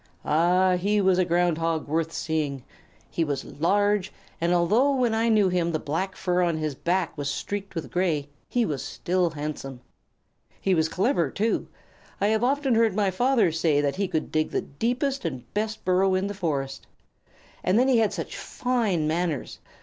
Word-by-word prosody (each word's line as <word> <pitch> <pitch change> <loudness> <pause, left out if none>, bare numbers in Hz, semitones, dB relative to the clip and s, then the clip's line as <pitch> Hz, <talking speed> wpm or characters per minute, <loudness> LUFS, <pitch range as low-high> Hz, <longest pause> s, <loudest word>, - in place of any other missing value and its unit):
Ah, 180 +4 +3
he 205 +3 +1
was 190 -2 +3
a 185 - +3
Ground 175 -1 +1
Hog 165 -1 -1
worth 165 +2 -1
seeing! 150 -6 -2 0.5
He 165 - 0
was 145 -3 -2
large, 200 +4 +1 0.3
and, 170 +1 +2
although 215 +11 +3
when 245 -3 +1
I 225 +1 +2
knew 210 -3 +4
him 175 -2 0
the - - +2
black 165 +7 -3
fur 180 -1 0
on 170 -2 +1
his 155 -2 -2
back 175 +5 -1
was 145 -1 -3
streaked 200 +6 -4
with 150 -8 -5
gray, 160 -5 0 0.2
he 245 -2 +1
was 145 -8 -3
still 180 0 0
handsome. 145 -4 -6 0.8
He 190 - +1
was 160 -2 +2
clever, 185 - +1
too. 220 - -1 0.5
I 200 - +2
have 220 +1 +1
often 275 0 +2
heard 225 -3 +3
my 200 -2 +2
father 240 -1 +2
say 160 -2 +2
that 145 +3 0
he 200 0 0
could 160 -3 -2
dig 155 0 +1
the - - -1
deepest 250 - -2
and 130 -8 -4
best 215 +1 -3
burrow 185 +1 +3
in 185 +1 0
the 200 - -3
forest. 145 -8 -3 0.8
And 185 +3 +2
then 255 +2 +4
he 255 -3 +4
had 220 -2 +2
such - - -5
fine 225 -11 -1
manners! 165 -2 -2
180 Hz, 185 wpm, -26 LUFS, 160-210 Hz, 0.8 s, knew